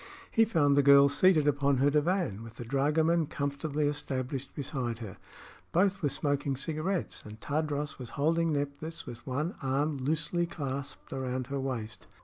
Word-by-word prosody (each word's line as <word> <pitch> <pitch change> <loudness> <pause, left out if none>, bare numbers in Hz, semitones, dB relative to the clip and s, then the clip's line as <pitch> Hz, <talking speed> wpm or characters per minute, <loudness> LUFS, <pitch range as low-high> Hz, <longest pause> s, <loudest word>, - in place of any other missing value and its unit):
He 225 - +5
found 150 -10 +3
the 145 - +6
girl 140 0 +7
seated 155 0 +4
upon 140 -1 +2
her 140 +3 +3
divan, 150 - +1
with 115 -1 -10
the 120 - -7
dragoman 155 +5 +2
comfortably 140 +2 -2
established 135 -2 -3
beside 130 -5 -3
her. 110 -5 -8 0.5
Both 195 +2 +2
were 145 - +2
smoking 145 -1 0
cigarettes 160 +6 -2
and 105 +1 -10
Tadros 150 +1 -2
was 125 -2 -7
holding 165 +3 +2
Nephthys 145 +3 -4
with 120 +2 -9
one 150 +8 -1
arm 140 +2 0
loosely 160 +5 0
clasped 140 -4 -5
around 130 -1 -2
her 140 - -1
waist. 115 -6 -4
140 Hz, 155 wpm, -30 LUFS, 135-155 Hz, 0.5 s, girl